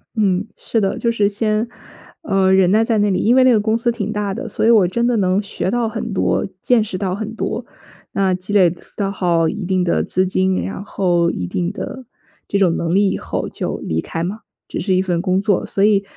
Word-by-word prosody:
嗯， 200 -3 +1
是 225 - -1
的， 195 - 0
就 235 - 0
是 210 -3 +2
先， 215 +2 0 0.6
呃， 195 -8 +2
忍 190 -2 +4
耐 220 +2 +4
在 225 -1 +1
那 205 0 +2
里， 190 - +1
因 230 - +3
为 260 0 +5
那 255 - +6
个 225 - +4
公 220 +1 +1
司 235 +1 +1
挺 215 -3 -3
大 205 -2 -2
的， 230 - -5
所 210 - -1
以 - - +5
我 220 -5 +6
真 235 +6 0
的 245 - +2
能 190 0 +2
学 200 -2 -3
到 240 -1 0
很 220 0 -4
多， 185 - +1 0.2
见 245 -3 +3
识 200 -3 -5
到 185 -1 -2
很 220 +1 -5
多， 230 +1 -3 0.5
那 190 -1 +1
积 185 +2 -5
累 195 -4 +5 0.3
到 200 -2 0
好 175 -4 +1
一 210 +4 -3
定 185 0 +1
的 170 - +1
资 185 +1 0
金， 185 0 +1
然 195 - -5
后 175 -4 +1
一 90 - -4
定 175 - -2
的 260 +5 -6 0.5
这 200 - +1
种 180 -4 +3
能 170 0 -1
力 200 +1 +4
以 - - -1
后 - - -4
就 - - -4
离 80 0 -1
开 165 - -5
嘛， 195 +6 -4 0.3
只 - - -4
是 190 +1 0
一 185 - +3
份 175 -3 -1
工 185 0 +1
作， 200 -1 +1
所 195 - -3
以， 200 -1 +4
200 Hz, 255 characters per minute, -19 LUFS, 185-220 Hz, 0.6 s, 那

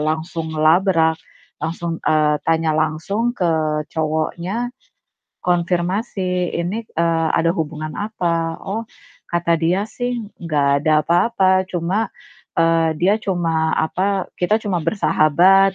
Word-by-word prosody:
langsung 160 +1 -2
ngelabrak. 160 0 +3 0.4
Langsung 165 +1 -3
eee, 150 -1 +2
tanya 160 -1 +2
langsung 160 +10 0
ke 155 -3 0
cowoknya, 170 +9 -2 0.7
konfirmasi, 180 +1 0
"Ini, 175 +6 -2 0.2
eee, 165 -1 +2
ada 165 0 +2
hubungan 155 -2 -4
apa?" 170 -6 -2
Oh, 220 +4 -3 0.5
kata 170 -1 +1
dia 175 +5 +1
sih, 245 -1 -3 0.2
"Gak 145 -3 +1
ada 155 -1 +4
apa-apa." 190 +2 +3
Cuma, 185 +5 -1 0.5
eee, 165 -1 +3
dia 195 +5 +4
cuma, 165 -5 0
apa, 190 +4 0
"Kita 210 +5 +2
cuma 195 -5 -1
bersahabat." 190 +1 +4
170 Hz, 110 wpm, -20 LUFS, 160-190 Hz, 0.7 s, ada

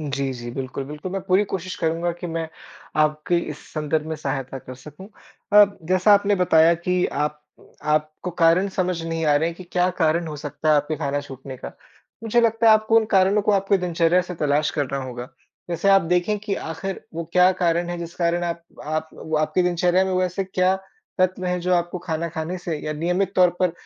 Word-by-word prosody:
जी, 140 -3 -2
जी। 120 -1 -7
बिल्कुल, 135 +2 -5
बिल्कुल। 150 +6 -7
मैं 195 - -2
पूरी 190 +3 +4
कोशिश 185 0 -3
करूँगा 165 +2 0
कि 175 - -4
मैं 165 -1 -2 0.5
आपकी 155 +3 0 0.2
इस - - -15
संदर्भ 155 0 -1
में 160 - -3
सहायता 135 -2 -4
कर 130 0 -10
सकूँ। 155 +7 -11 0.5
अब 200 -1 +4
जैसा 185 +3 +5
आपने 205 0 +3
बताया 165 -1 +5
कि 180 0 +2 0.2
आप 150 0 -9 0.5
आपको 155 +3 -1
कारण 180 +4 +4
समझ 185 -3 -2
नहीं 165 0 -2
आ 145 - +4
रहे 160 +3 +1
हैं 170 - -7
कि 185 - -10
क्या 180 0 +2
कारण 165 +1 +2
हो 150 - -6
सकता 145 +1 -4
है - - +6
आपका 150 +2 -1
खाना 145 -1 -2
छूटने 135 -1 -9
का। - - -8 0.5
मुझे 230 +2 +2
लगता 230 0 +2
है 220 - +9
आपको 215 +1 +3
उन 225 - +5
कारणों 195 +2 +4
को 210 - +2
आपके 195 0 +2
दिनचर्या 175 0 +2
से 180 0 -7
तलाश 150 -1 +1
करना 140 -2 -2
होगा। 125 -1 -7 0.4
जैसे 170 +4 0
आप 195 -1 +6
देखे 180 +4 +2
कि 200 -2 -1
आखिर 165 +4 -5
वो 165 0 -3
क्या 180 0 +6
कारण 170 0 +1
है 175 - -3
जिस 170 0 -7
कारण 175 0 0
आप 170 0 -3 0.2
आप 155 +1 -2
वो 160 -1 -3
आपकी 155 +4 +1
दिनचर्या 180 +1 +2
में 190 - -2
वैसे 185 +1 0
क्या 185 0 +1 0.4
तत्व 185 0 +1
हैं 180 0 0
जो 180 +1 +1
आपको 175 +1 -1
खाना 170 -1 -3
खाने 165 +2 -4
से 170 -3 -4
या 155 - -2
नियमित 180 +5 -1
तौर 180 -1 +6
पर 180 -2 +2
170 Hz, 210 wpm, -23 LUFS, 155-185 Hz, 0.5 s, है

